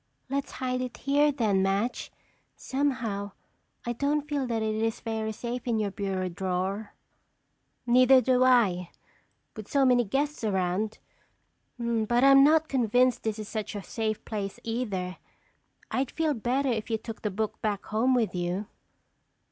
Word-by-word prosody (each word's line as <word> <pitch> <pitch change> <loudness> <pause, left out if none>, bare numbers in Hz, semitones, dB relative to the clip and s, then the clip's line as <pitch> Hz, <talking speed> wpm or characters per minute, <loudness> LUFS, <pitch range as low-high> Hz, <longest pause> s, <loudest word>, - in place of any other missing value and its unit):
"Let's 280 0 -2
hide 255 -1 -2
it 255 -1 -5
here 290 +2 +3
then, 215 -8 +1
Madge. 195 +5 -1 0.4
Somehow, 235 -8 -2 0.5
I 240 - -1
don't 285 +4 0
feel 285 -3 -1
that 225 -2 -1
it 215 0 0
is 225 +1 -1
very 220 -1 -3
safe 240 +3 -5
in 230 -2 +1
your 210 -2 -1
bureau 190 -2 -2
drawer." 190 +3 -3 0.9
"Neither 255 +2 +6
do 255 0 +3
I, 205 -9 +3 0.7
with 215 -3 -8
so 275 -1 +3
many 250 -1 +4
guests 280 +6 -2
around. 195 +1 0 0.8
But 235 0 +1
I'm 275 0 +8
not 315 +2 +4
convinced 250 -1 +2
this 220 -1 -2
is 215 -1 -6
such 215 -1 -4
a 200 - -5
safe 215 0 -3
place 200 -3 -4
either. 205 -6 -3 0.7
I'd 260 0 0
feel 320 -2 0
better 260 +3 0
if 225 -2 -2
you 225 - +1
took 225 0 -8
the 210 - -1
book 215 +2 -3
back 205 -2 -2
home 240 +5 +2
with 230 -4 +1
you." 180 +3 -2
225 Hz, 155 wpm, -28 LUFS, 205-255 Hz, 0.9 s, I'm